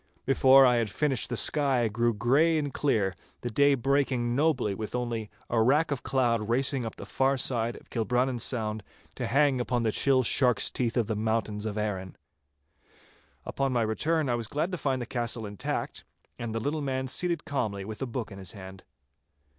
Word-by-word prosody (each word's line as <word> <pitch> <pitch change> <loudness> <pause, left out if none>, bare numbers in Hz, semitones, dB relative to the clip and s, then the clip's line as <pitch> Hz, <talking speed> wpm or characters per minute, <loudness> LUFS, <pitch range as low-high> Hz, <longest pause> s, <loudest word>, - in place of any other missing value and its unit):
Before 135 0 +6
I 125 -1 +4
had 115 -2 0
finished 135 +2 -1
the 120 - -2
sky 135 -5 +4
grew 120 +2 +1
grey 135 +10 +2
and 145 -3 -2
clear, 105 -10 +1 0.3
the 120 - -4
day 140 +4 +4
breaking 130 -2 0
nobly 135 -8 +1
with 110 +4 -5
only 120 -3 -3 0.2
a 115 -1 +1
rack 145 +7 +3
of 135 -3 -2
cloud 115 -5 0
racing 130 +2 +2
up 115 - -5
the - - -9
far 135 +1 +1
side 120 -2 -1
of - - -16
Kilbrannan 125 +2 0
Sound 110 -2 -2 0.3
to - - -4
hang 140 -1 +2
upon 120 -1 -1
the 110 - +1
chill 130 +3 +3
shark's 125 0 +2
teeth 120 -1 -1
of 120 - +2
the 110 +1 -2
mountains 110 -1 -1
of 105 0 -4
Arran. 95 -3 -3 1.3
Upon 135 -1 -1
my 120 -2 +2
return 150 +8 0
I 120 - +1
was 115 -2 -2
glad 155 - -2
to 180 - -3
find 130 -3 -1
the - - -6
castle 120 -2 -3
intact, 105 -1 -4 0.4
and 115 -1 -4
the - - 0
little 150 +6 -2
man 130 -1 -2
seated 170 +4 -1
calmly 110 - -2
with 110 +3 -7
a 135 - -2
book 115 -2 -5
in 100 - -9
his 95 -2 -6
hand. 95 -2 -11
120 Hz, 195 wpm, -28 LUFS, 110-135 Hz, 1.3 s, Before